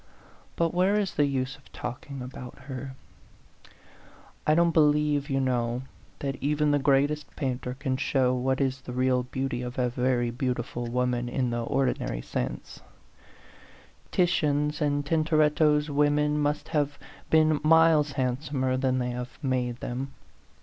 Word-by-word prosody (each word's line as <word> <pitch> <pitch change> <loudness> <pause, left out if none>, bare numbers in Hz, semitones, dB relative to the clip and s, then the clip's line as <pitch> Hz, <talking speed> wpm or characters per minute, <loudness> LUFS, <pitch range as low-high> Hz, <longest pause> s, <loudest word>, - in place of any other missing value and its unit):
But 170 0 +1
where 185 +3 +3
is 200 -2 -1
the 145 - +2
use 135 0 -2
of 140 - -22
talking 130 +2 -6
about 125 -1 -9
her? 130 -1 -7 1.5
I 155 - +5
don't 170 0 +4
be 160 - +4
lieve, 150 -1 +3
you 135 -1 +1
know, 125 -1 0 0.3
that 135 -2 -3
even 150 +2 +1
the 145 - +3
greatest 145 +2 +1
painter 125 -3 -3
can 135 -1 -2
show 130 -1 +2
what 130 +1 0
is 135 -1 0
the 125 - -7
real 130 0 +2
beauty 125 0 -3
of 125 0 -6
a 125 -1 +1
very 125 -1 0
beautiful 120 -1 -3
woman 125 0 0
in 125 0 -1
the 120 0 -1
ordinary 130 - -1
sense: - - -5 1.3
Titian's 150 -4 +1
and 145 -1 +1
Tintoretto's 155 -1 +2
women 150 +1 +2
must 150 +1 -1
have 145 -3 0 0.3
been 155 -1 +4
miles 160 -2 +5
handsomer 130 0 -1
than 130 -1 +1
they 125 -1 -1
have 125 0 -6
made 125 -2 -1
them. 135 +2 -4
135 Hz, 145 wpm, -27 LUFS, 125-150 Hz, 1.5 s, I